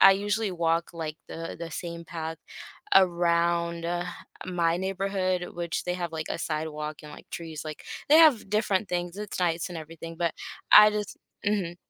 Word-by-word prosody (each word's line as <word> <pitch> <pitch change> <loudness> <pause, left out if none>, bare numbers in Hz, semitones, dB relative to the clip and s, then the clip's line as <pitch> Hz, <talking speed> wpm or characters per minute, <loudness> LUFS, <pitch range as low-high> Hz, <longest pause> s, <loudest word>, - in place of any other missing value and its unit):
I 195 - +10
usually 205 +1 0
walk, 165 -1 +1
like, 160 -2 -5
the 165 0 -6
the 170 0 -6
same 170 0 -6
path 160 -1 -5 0.6
around 170 -2 +3 0.6
my 170 -2 +1
neighborhood, 190 -1 -1
which 170 -1 -3
they 180 0 -1
have, 175 -2 -4
like, 155 -1 -4
a - - -2
sidewalk 155 -1 -3
and, 150 - -10
like, - - -13
trees. 160 -2 -6
Like, 155 -1 -7 0.2
they 305 - +8
have 300 -11 +6
different 210 -2 +1
things. 175 +1 -2
It's 210 -2 -5
nice 170 0 +1
and 175 -2 -6
everything, 165 +1 -9
but 170 -2 0 0.4
I 210 0 +10
just 210 -1 -3 0.3
mhm. 185 -5 0
170 Hz, 165 wpm, -27 LUFS, 165-190 Hz, 0.6 s, I